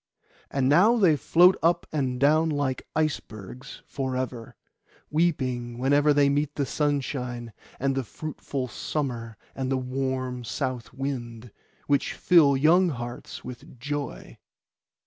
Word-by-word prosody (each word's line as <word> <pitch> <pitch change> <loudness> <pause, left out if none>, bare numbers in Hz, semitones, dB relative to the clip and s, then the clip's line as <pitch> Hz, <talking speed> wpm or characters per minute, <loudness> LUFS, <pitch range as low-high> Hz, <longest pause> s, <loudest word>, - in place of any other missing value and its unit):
And 135 -2 0
now 190 - +5
they 180 -8 +5
float 175 +6 +5
up 170 +2 +2
and 130 -5 -1
down 155 +4 +4
like 145 -3 -2
icebergs 130 -5 -4
for 130 -2 -3
ever, 125 -3 -5 0.6
weeping 130 -7 0
whenever 145 +4 +3
they 145 -1 +4
meet 145 +1 0
the 140 - 0
sunshine, 125 -5 -2 0.3
and 135 +1 +1
the 135 0 -1
fruitful 140 0 -5
summer 120 -5 -4 0.2
and 130 0 -3
the 135 - +2
warm 130 -1 -3
south 120 +2 -3
wind, 120 -4 -5 0.3
which 145 -1 +1
fill 150 -6 +5
young 170 +6 +5
hearts 120 -3 -7
with 125 0 -10
joy. 145 +1 -5
135 Hz, 125 wpm, -26 LUFS, 125-150 Hz, 0.6 s, now